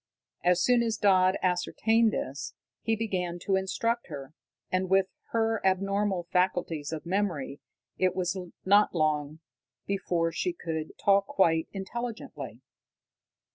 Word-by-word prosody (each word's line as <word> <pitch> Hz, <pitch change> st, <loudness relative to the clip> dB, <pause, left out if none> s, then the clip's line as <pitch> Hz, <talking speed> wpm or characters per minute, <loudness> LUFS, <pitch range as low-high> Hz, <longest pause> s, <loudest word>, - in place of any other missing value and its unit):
As 180 Hz, 0 st, +3 dB
soon 245 Hz, -1 st, +4 dB
as 225 Hz, -1 st, 0 dB
Dodd 190 Hz, -3 st, +4 dB
ascertained 220 Hz, +5 st, +2 dB
this, 140 Hz, -6 st, -4 dB, 0.3 s
he 225 Hz, -, +1 dB
began 185 Hz, -6 st, -2 dB
to 195 Hz, -, +2 dB
instruct 230 Hz, +5 st, -1 dB
her, 140 Hz, +1 st, -8 dB, 0.4 s
and, 185 Hz, 0 st, 0 dB
with 190 Hz, 0 st, +4 dB, 0.2 s
her 225 Hz, -1 st, 0 dB
abnormal 195 Hz, 0 st, +1 dB
faculties 180 Hz, -5 st, 0 dB
of 155 Hz, -1 st, -5 dB
memory, 170 Hz, -7 st, -1 dB, 0.4 s
it 185 Hz, -1 st, +2 dB
was 185 Hz, 0 st, 0 dB, 0.3 s
not 205 Hz, 0 st, +5 dB
long 155 Hz, -1 st, 0 dB, 0.4 s
before 175 Hz, -4 st, 0 dB
she 360 Hz, -, -1 dB
could 160 Hz, -, -5 dB
talk 200 Hz, 0 st, +3 dB
quite 165 Hz, -4 st, +2 dB
intelligently. 195 Hz, -, -6 dB
185 Hz, 125 wpm, -28 LUFS, 165-205 Hz, 0.4 s, not